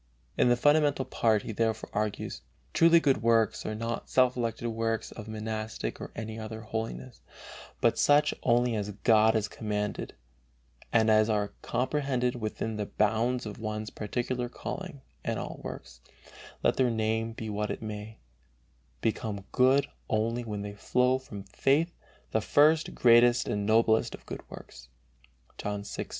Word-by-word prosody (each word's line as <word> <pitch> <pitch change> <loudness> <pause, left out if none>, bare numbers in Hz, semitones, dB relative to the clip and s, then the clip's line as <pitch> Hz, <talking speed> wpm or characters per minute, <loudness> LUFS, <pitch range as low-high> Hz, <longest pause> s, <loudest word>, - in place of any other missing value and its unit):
In - - +3
the 120 - +5
fundamental 145 -1 +3
part 110 -3 +1
he - - -5
therefore 110 0 -1
argues: 105 - -2 0.3
"Truly 170 0 +6
good 135 -8 +2
works 115 -1 +2
are 110 - -3
not 115 +1 -4
self 130 -1 +3
elected 120 -1 -2
works 115 0 -2
of 110 -1 -9
monastic 110 0 -4
or - - -6
any 110 0 -5
other 110 0 -6
holiness, 110 - -5 0.6
but - - +3
such 145 +1 +4
only 120 -1 +2
as 105 -1 -2
God 110 0 +5
has 105 -1 +1
commanded, 105 -1 -3 0.8
and 110 -1 +4
as 110 +1 +4
are 105 -1 0
comprehended 130 -2 0
within 110 -1 -4
the 105 -1 -3
bounds 115 +4 +1
of 105 -1 -7
one's 110 -1 -4
particular 120 +3 -3
calling, 170 +2 -6 0.2
and - - -2
all - - -6
works, - - -8 0.6
let - - +2
their 130 -2 +3
name 115 0 -1
be 110 0 -6
what 105 0 -2
it - - -4
may, 110 0 -6 0.8
become 105 -3 -2
good 130 +2 +4 0.2
only 115 +3 0
when 105 -3 -4
they 105 0 -6
flow 125 +5 +1
from 105 -6 -9
faith, 140 - +1 0.4
the 110 - +1
first, 155 +7 +3
greatest, 120 0 +5
and 105 0 -1
noblest 110 0 +3
of - - -19
good - - -6
works." 65 0 -11 0.7
(John 105 0 -3
6:29.) 100 - -6
110 Hz, 155 wpm, -29 LUFS, 110-125 Hz, 0.8 s, Truly